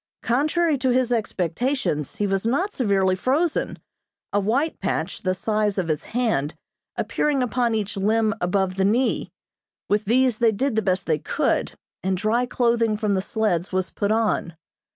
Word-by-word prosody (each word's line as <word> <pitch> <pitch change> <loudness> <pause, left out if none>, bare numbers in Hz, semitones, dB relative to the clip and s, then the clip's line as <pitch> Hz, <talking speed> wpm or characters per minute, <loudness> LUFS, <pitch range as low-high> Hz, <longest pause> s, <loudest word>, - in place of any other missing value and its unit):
Contrary 300 +4 +1
to 260 - +1
his 250 -1 +2
expectations, 210 - -1
he 205 - -1
was 195 -1 0
not 280 - 0
severely 195 - +2
frozen, 280 - 0 0.6
a 205 - +3
white 255 +11 0
patch, 190 -1 -2
the 185 0 0
size 210 +1 0
of 180 -3 -1
his 155 -2 -1
hand, 220 - -1 0.4
appearing 285 -3 0
upon 240 -1 0
each 210 -2 -2
limb 215 +2 +2
above 185 +1 0
the 190 - +2
knee. 230 +7 +1 0.6
With 210 +1 +1
these 245 +1 +2
they 230 -2 +4
did 260 +3 -1
the 220 - +2
best 185 -2 0
they 155 -2 +1
could, - - 0 0.3
and 190 0 0
dry 225 +5 +1
clothing 235 -3 +1
from 210 -2 0
the 190 - +1
sleds 195 -4 -1
was 185 -1 -1
put 205 0 -1
on. 215 -6 0
215 Hz, 165 wpm, -23 LUFS, 190-245 Hz, 0.6 s, they